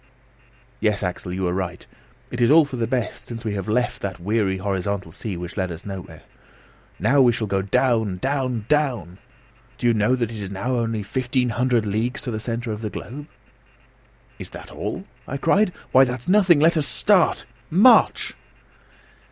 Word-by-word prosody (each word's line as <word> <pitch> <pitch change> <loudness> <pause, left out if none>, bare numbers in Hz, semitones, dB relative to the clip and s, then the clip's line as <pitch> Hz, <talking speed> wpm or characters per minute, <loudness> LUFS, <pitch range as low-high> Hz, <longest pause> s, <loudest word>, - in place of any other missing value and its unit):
"Yes, 105 -2 +1
Axel, 90 0 -3
you 95 0 -1
are 90 - 0
right. 90 -1 -4 0.5
It 125 - -3
is 120 - +4
all 155 +1 +7
for 140 - -7
the 115 -2 -1
best, 125 -1 -3
since 115 -1 -7
we 105 - -1
have 100 -1 -4
left 120 +3 0
that 95 -2 -4
weary, 100 +1 0
horizontal 95 -2 -2
sea, 100 +2 -5
which 90 +2 -7
led 95 -2 -1
us 85 +2 -9
nowhere. 95 -2 -8 0.7
Now 140 0 +3
we 125 -2 +6
shall 115 -1 -2
go 100 -1 0
down, 110 -2 +1
down, 130 -1 -1
down! 125 - 0 0.6
Do - - -4
you 120 - +5
know 110 +3 +2
that 120 -3 -2
it 110 - -7
is 100 -2 -5
now 100 +7 -2
only 115 -2 -1
1,500 125 0 0
leagues 110 +6 -1
to 125 - -3
the 110 - -3
centre 115 +1 -3
of 105 0 -5
the 110 - -3
globe?" 140 +9 -8 1.1
"Is - - -6
that - - -10
all?" - - -5 0.2
I 140 - -3
cried. 185 +8 +3 0.2
"Why, 130 - +7
that's 125 -1 -3
nothing. 185 -5 +5
Let 165 +2 +4
us 150 -2 +1
start: 195 -5 +2 0.2
march!" 205 +10 +5
115 Hz, 180 wpm, -23 LUFS, 100-130 Hz, 1.1 s, all